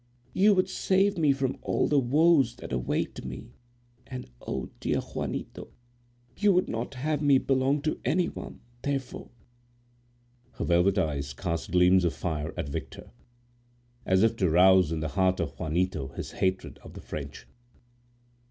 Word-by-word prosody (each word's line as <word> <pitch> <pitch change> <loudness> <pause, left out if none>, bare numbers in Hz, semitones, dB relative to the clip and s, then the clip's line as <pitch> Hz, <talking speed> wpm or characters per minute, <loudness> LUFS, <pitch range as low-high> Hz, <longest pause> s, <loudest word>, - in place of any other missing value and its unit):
You 205 +2 +5
would 185 0 +2
save 195 +1 +1
me 150 -3 +4
from 135 -1 -1
all - - 0
the 145 - +3
woes 140 -1 +3
that - - -8
await - - -2
me—and, 120 - -11
oh! 65 - -5
dear - - 0
Juanito! - - -5 0.7
you 210 -1 +3
would 180 - +2
not 115 +4 -4
have 150 +3 -1
me 140 -2 +5
belong 135 +2 +1
to 155 - -1
any 170 +7 +1
one—therefore—" 130 +1 -6 1.2
Her - - -4
velvet 90 +3 +3
eyes 70 -6 -1
cast 85 +3 -4
gleams 90 +1 +5
of 85 - 0
fire 80 -3 -3
at 85 -5 -3
Victor, 70 -3 -7 0.9
as 95 +2 +3
if 115 0 +3
to 95 -5 +2
rouse 90 0 +5
in 80 -1 -2
the 80 - -2
heart 95 +5 +1
of 70 -5 -4
Juanito 85 -3 -1
his 65 - -7
hatred 95 0 -2
of - - -13
the - - -8
French. 70 -2 -7
110 Hz, 150 wpm, -27 LUFS, 85-140 Hz, 1.2 s, You